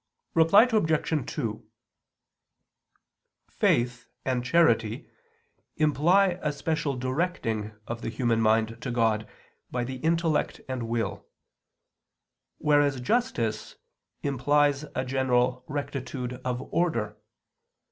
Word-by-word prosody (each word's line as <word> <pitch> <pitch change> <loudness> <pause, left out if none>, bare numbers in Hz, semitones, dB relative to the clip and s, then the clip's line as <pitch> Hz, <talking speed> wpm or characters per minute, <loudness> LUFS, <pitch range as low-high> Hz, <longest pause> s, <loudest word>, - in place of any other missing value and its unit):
Reply 165 +6 +6
Obj. 160 - 0
2: 110 -2 -3 1.8
Faith 120 0 0 0.2
and 125 -2 0
charity 120 -7 +2 0.7
imply 175 +5 +3
a 150 - 0
special 150 -1 -2
directing 125 - -2
of 120 0 -5
the - - -3
human 115 0 0
mind 110 +1 +2
to 125 - -4
God 115 -3 +1 0.4
by 125 -1 -2
the 130 +2 -5
intellect 165 +2 0
and 125 -3 -4
will; 115 -1 -2 1.3
whereas 145 -3 +3
justice 125 - -1 0.5
implies 145 +1 +2
a 130 - -1
general 125 -1 +1
rectitude 130 -3 -4
of 125 0 -2
order. 115 -12 0
130 Hz, 95 wpm, -27 LUFS, 120-155 Hz, 1.8 s, Reply